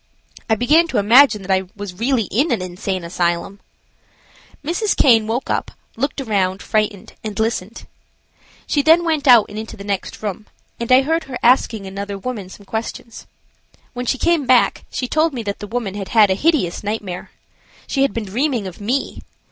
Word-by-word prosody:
I 220 - +4
began 300 +9 +3
to 260 - -2
imagine 220 +1 +5
that 190 - -4
I 190 0 +1
was 205 -2 -7
really 245 0 +1
in 280 - +1
an 235 - +1
insane 185 +1 -4
asylum. 175 +3 -2 1.1
Mrs. 355 +7 0
Caine 225 -5 +5
woke 235 +4 -2
up, - - -1 0.3
looked 275 +5 -2
around, 200 -6 -1
frightened, 210 -2 -1
and 215 0 -5
listened. 220 -1 -2 0.8
She 290 - +1
then 325 +4 +5
went 310 -3 0
out 240 -4 +8
and 210 +1 -7
into 220 +1 -8
the 200 - -9
next 200 +1 -4
room, 210 0 -4 0.3
and 235 +1 -3
I 255 +1 +7
heard 325 +3 0
her 255 -2 -6
asking 235 -4 +3
another 200 +1 -5
woman 205 -3 -5
some 200 +1 -13
questions. 225 +2 -6 0.7
When 245 0 -5
she 265 - +1
came 330 -2 +1
back 250 -1 +3
she 255 - -3
told 310 +1 +1
me 235 - -4
that 200 -1 -4
the 205 - -7
woman 230 -3 -3
had 200 -2 -5
had 215 -4 +5
a - - +4
hideous 255 - 0
nightmare. 205 -4 -4 0.6
She 270 - -1
had 275 - +3
been 230 -2 -4
dreaming 240 +2 -1
of 185 +1 -8
me. 250 +7 -2
225 Hz, 185 wpm, -19 LUFS, 200-265 Hz, 1.1 s, out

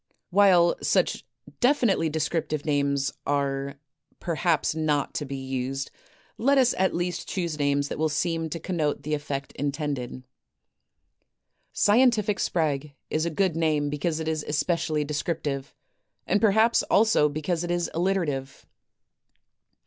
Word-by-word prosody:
While 180 -3 +5
such - - +1 0.4
definitely 240 - +3
descriptive 155 0 -2
names 140 -2 0
are 140 -1 -1 0.4
perhaps 170 -2 0
not 155 -3 0
to 150 - -3
be 140 0 -5
used, 135 0 -3 0.5
let 275 +4 +3
us 255 -2 +4
at 190 0 +2
least 175 +1 -3
choose 170 -5 -3
names 140 0 +1
that - - -5
will 160 0 +2
seem 165 +2 -1
to 165 - -4
connote 160 -4 -2
the 150 - -3
effect 145 -2 -3
intended. 140 -3 -3 0.8
*' - - -50
Scientific 215 -2 +3
Sprague 150 -4 -1
" - - -57
is 155 +2 0
a - - +1
good 180 0 0
name 155 -3 +1
because 155 +2 -1
it 160 - -4
is 155 -1 -1
especially 155 0 0
descriptive; 145 -2 -3 0.5
and 200 +3 +1
perhaps 220 +2 +4
also 215 -8 +4
because 160 +3 -2
it 175 - -4
is 175 0 0
alliterative. 165 -7 -1
155 Hz, 135 wpm, -26 LUFS, 145-175 Hz, 0.8 s, While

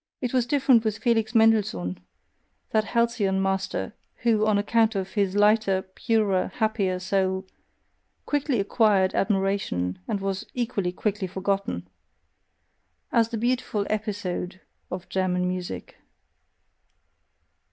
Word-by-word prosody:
It 250 -1 -3
was 250 -2 +2
different 260 -4 +4
with 215 -2 -1
Felix 230 -1 +1
Mendelssohn, 210 - +3 0.7
that 215 -1 +2
halcyon 225 -5 +1
master, 195 0 -1 0.3
who, 220 -2 +3
on 210 -1 +3
account 220 +1 +2
of 190 -1 -2
his 200 -3 0
lighter, 205 -2 +3
purer, 210 -5 +1
happier 215 -5 0
soul, 190 0 0 0.8
quickly 285 -4 0
acquired 200 -2 +3
admiration, 195 - 0
and 200 - -1
was 195 0 -3
equally 225 -7 -1
quickly 205 +1 -2
forgotten: 190 - -2 1.2
as 230 -1 +3
the 230 - -3
beautiful 235 -3 0
EPISODE 200 -4 -3 0.3
of 180 0 -6
German 180 -1 0
music. 180 -1 -5
200 Hz, 110 wpm, -25 LUFS, 190-225 Hz, 1.2 s, different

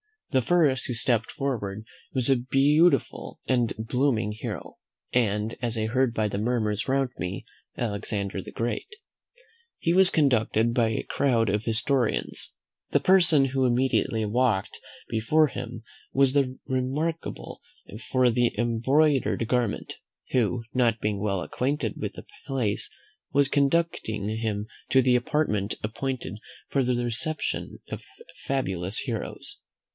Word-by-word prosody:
The 130 -3 +3
first 145 -3 +2
who 125 - -2
stepped 115 -1 +1
forward 110 -7 -3 0.3
was 130 -1 0
a 135 - +5
beautiful 140 +4 +2
and 120 -4 +2
blooming 115 -1 0
hero, 105 - -6 0.3
and, 110 -2 +1
as 120 -2 -1
I 110 0 0
heard 130 +1 +1
by 110 -2 0
the 100 - -3
murmurs 110 -1 0
round 135 -1 +1
me, 90 +1 -4 0.3
Alexander 100 -3 -2
the - - -10
Great. 120 +1 -2 0.9
He 170 - +1
was 190 0 +6
conducted 115 -5 +2
by 115 -2 +3
a 110 - -1
crowd 115 -6 +1
of 105 +2 0
historians. 120 +2 0 0.4
The - - +3
person 170 -7 +5
who 135 0 +1
immediately 125 -2 +1
walked 110 -2 0 0.3
before 135 +8 +3
him 120 -3 -7 0.3
was 135 0 +3 0.3
remarkable 130 - -3 0.5
for 130 -1 +2
an 120 -2 +4 0.2
embroidered 125 +2 +2
garment, 120 -4 -1 0.4
who, 120 -1 +1
not 120 -3 +2
being 105 -2 -1
well 100 -2 -1
acquainted 125 - -2
with - - -4
the - - -10 0.2
place, 125 -7 -1 0.4
was 140 -1 +4
conducting 140 -8 +1
him 110 -2 -2 0.3
to 135 - +6
an 125 -1 +4
apartment 120 -7 0
appointed 115 -1 -3 0.3
for 135 - +2
the 125 0 +1
reception 120 +6 -2
of - - -5 0.4
fabulous 95 -8 -2
heroes. 115 -6 -4
120 Hz, 130 wpm, -26 LUFS, 110-135 Hz, 0.9 s, was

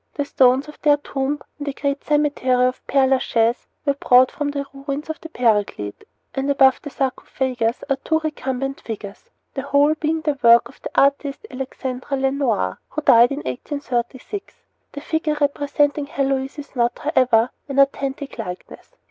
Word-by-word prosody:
The 285 - -1
stones 265 +1 +3
of 300 - -13
their 290 -1 +5
tomb 280 0 -3 0.2
in 290 - -5
the 280 - -3
great 280 0 -2
cemetery 285 -4 +2
of 255 0 -1
Pere 275 -1 +3
Lachaise 240 -3 +1 0.2
were 280 - +3
brought 255 -2 +4
from 295 -1 -2
the 280 -1 -3
ruins 280 +2 -4
of 315 - -9
the 325 - -9
Paraclete, 210 - 0 0.3
and 270 +1 -2
above 270 -2 +4
the 290 - -7
sarcophagus 255 -3 -2
are 275 -1 +1
two 320 - 0
recumbent 270 -3 -3
figures, 205 -3 -8 0.2
the 270 - -3
whole 285 +2 +3
being 315 +1 -1
the 300 -3 -1
work 235 0 +6
of - - -19
the - - -5
artist 280 +5 +1
Alexandra 260 +1 -4
Lenoir, 265 - 0
who 310 - -4
died 240 -3 +7
in 280 - -4
1836. 260 - -4 0.3
The 285 - -6
figure 315 -1 -1
representing 285 0 +1
Heloise 270 0 -1
is 290 -1 -10
not, 240 -1 +1
however, 255 -6 +2 0.2
an 275 - -4
authentic 275 -1 0
likeness. 180 -5 -8
275 Hz, 165 wpm, -21 LUFS, 255-290 Hz, 0.3 s, died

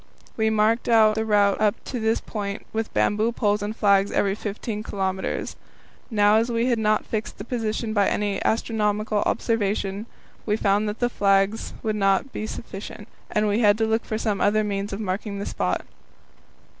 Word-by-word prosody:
We 220 - 0
had 220 0 +2
marked 220 +3 +2
out 220 -2 +6
the 220 +1 -1
route 205 -2 +3
up 210 -1 +3
to 250 - -4
this 220 0 +1
point 200 -2 -5
with 220 0 -2
bamboo 210 - +1
poles 210 -3 +1
and 210 +2 -3
flags 200 -2 +3
at - - -3
every 195 -1 +2
15 210 +1 -4
kilometres. 190 -2 -3 0.5
Now, 210 -2 +4
as 230 +2 +1
we 230 0 +1
had 240 -3 +1
not 215 0 +1
fixed 220 +1 -4
the - - -6
position 225 -1 -2
by 205 -2 +3 0.3
astronomical 215 -1 0
observation, 205 -2 -1 0.4
we 210 -1 0
found 205 0 +1
that 210 - -5
the 245 - +1
flags 195 -1 +1
would 215 -1 -1
not 195 +6 +1
be 215 - -4
sufficient, 205 -1 -8 0.2
and 210 0 +1
we 205 +2 +1
had 210 -3 +4
to 225 - +1
look 220 0 0
for 215 - -3
some 210 -3 -1
other 215 +1 +3
means 200 0 -3
of 195 - -4
marking 200 0 -3
the 200 - -4
spot. 90 0 -1
210 Hz, 185 wpm, -24 LUFS, 200-220 Hz, 0.5 s, out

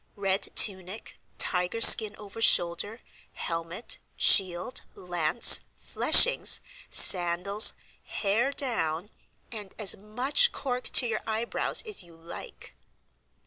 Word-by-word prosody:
Red 195 -1 -4
tunic, 190 +1 -1 0.2
tiger 180 +4 -1
skin 215 -2 +5
over 210 +2 -13
shoulder, 205 +3 0 0.3
helmet, 165 +6 -7 0.2
shield, 185 +3 +1
lance, 175 +2 +1 0.2
fleshings, - - +4 0.3
sandals, 180 +4 +3 0.3
hair 225 +6 -3
down, 205 - -5 0.4
and 210 -4 -11
as 210 -4 +1
much 250 - -1
cork 250 -2 -7
to 255 - +3
your 220 -2 -5
eyebrows 225 +1 -3
as 430 -2 -4
you 170 -1 -16
like." 165 +1 -14
200 Hz, 100 wpm, -24 LUFS, 175-230 Hz, 0.4 s, skin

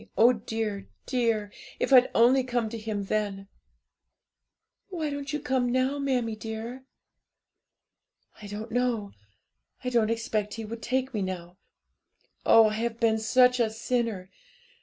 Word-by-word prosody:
Oh, 240 +3 +6
dear, 220 -3 -4 0.2
dear! 230 -5 0 0.3
if - - +1
I'd 255 -1 +7
only 255 +3 +5
come 240 -3 -1
to 230 - -6
Him 215 -2 -3
then!' 195 -1 -2 1.4
'Why 320 -5 -3
don't 285 -1 -5
you 300 - -2
come 255 -3 0
now, 260 +3 +1
mammie 250 -5 0
dear?' 225 +4 -7 1.6
'I 210 - -8
don't 210 +3 -7
know; 235 -4 0 0.7
I 250 - -1
don't 230 -3 +2
expect 220 -2 -2
He 225 -1 -6
would 225 +2 -7
take 260 +2 -1
me 210 - -1
now; 180 -1 -5 0.9
oh, 225 -1 +7
I - - -4
have 230 +1 -2
been 220 -1 +2
such 250 +3 +4
a 230 -2 +3
sinner! 225 -4 -2
230 Hz, 140 wpm, -27 LUFS, 215-250 Hz, 1.6 s, I'd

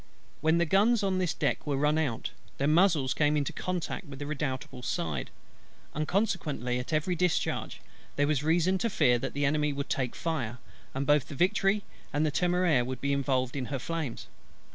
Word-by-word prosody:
When 160 +2 +3
the 170 - +3
guns, 205 +6 +3
on 190 -1 +1
this 180 -4 0
deck - - -1
were 140 -2 0
run 150 +2 +2
out, 135 -8 -2 0.3
their 140 - +1
muzzles 155 -4 +4
came 150 0 +2
into 145 -2 -1
contact 180 -4 -3
with 140 -1 -9
the 145 - -5
Redoutable's 135 -4 -4
side; 75 -7 -2 0.6
and 155 0 -2
consequently 145 - 0
at 125 - -6
every 155 +4 +1
discharge 180 0 -1 0.3
there 145 - +2
was 145 -2 +1
reason 170 +4 +2
to 230 - 0
fear 125 - +3
that 135 +2 -4
the 145 0 +1
Enemy 150 0 +1
would 140 +1 -4
take 125 -3 -1
fire, 130 -8 -2 0.4
and 135 +1 -1
both 145 0 +3
the 145 - -7
Victory 195 +4 +2 0.3
and 150 +2 +1
the 155 - +1
Temeraire 175 -5 +2
be 140 +2 -1
involved 130 -2 0
in 135 -2 -2
her 135 +2 -3
flames. 155 -2 -4
150 Hz, 185 wpm, -29 LUFS, 135-170 Hz, 0.6 s, muzzles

